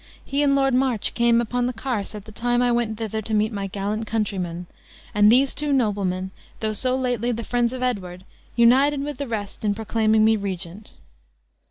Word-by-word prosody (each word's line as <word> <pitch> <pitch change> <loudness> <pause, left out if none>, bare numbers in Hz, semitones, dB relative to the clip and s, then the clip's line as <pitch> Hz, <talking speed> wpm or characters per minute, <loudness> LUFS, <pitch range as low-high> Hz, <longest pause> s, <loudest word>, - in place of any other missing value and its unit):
He 280 +1 -1
and 280 -1 +3
Lord 270 -1 +2
March 255 -4 +1
came 235 -1 +3
upon 245 +1 0
the 250 - -2
carse 225 -3 -3
at 210 -1 -8
the 220 - -11
time 240 +3 0
I 245 - +3
went 235 -2 0
thither 220 -1 -3
to 220 +1 -5
meet 215 +2 +1
my 200 -1 -3
gallant 205 +3 -3
countrymen; 185 -6 -2 0.5
and 210 +1 +5
these 265 +3 +4
two 295 -1 -2
noblemen, 195 -7 0 0.3
though 215 -1 -1
so 255 +4 0
lately 245 -2 0
the 235 0 -3
friends 240 0 0
of 255 0 -4
Edward, 185 -7 -3 0.3
united 270 +5 +4
with 295 0 -5
the 280 - -3
rest 210 -3 -5
in 205 -1 +1
proclaiming 220 0 +2
me 220 0 +4
regent." 195 0 -6
225 Hz, 195 wpm, -23 LUFS, 205-245 Hz, 0.5 s, and